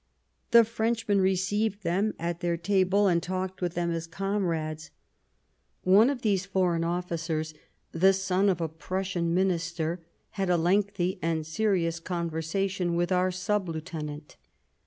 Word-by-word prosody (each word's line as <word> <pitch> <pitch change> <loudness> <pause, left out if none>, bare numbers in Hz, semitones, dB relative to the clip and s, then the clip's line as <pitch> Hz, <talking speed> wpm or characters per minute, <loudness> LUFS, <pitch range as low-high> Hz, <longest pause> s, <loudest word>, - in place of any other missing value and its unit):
The 235 0 +8
Frenchmen 225 -2 0
received 195 +2 0
them 190 +5 0
at 170 0 -3
their 170 -1 -1
table 195 +2 +2
and 170 -2 +3
talked 185 +1 -4
with 175 -1 -2
them 170 0 0
as 165 0 -3
comrades. 165 -4 -2 0.9
One 200 +7 +6
of 275 -4 -3
these 200 -4 +2
foreign 180 -3 +1
officers, 165 -2 -2 0.4
the 190 +4 +5
son 195 +1 +1
of 180 -3 +1
a 165 - 0
Prussian 175 +1 -3
Minister, 175 -2 0 0.3
had 195 -2 -2
a 175 - +4
lengthy 190 +1 +1
and 160 -1 -1
serious 170 -1 0
conversation 170 +2 -2
with 175 +1 0
our 185 0 +3
sub 185 +1 -1
lieutenant. 155 -2 -6
180 Hz, 135 wpm, -28 LUFS, 165-195 Hz, 0.9 s, The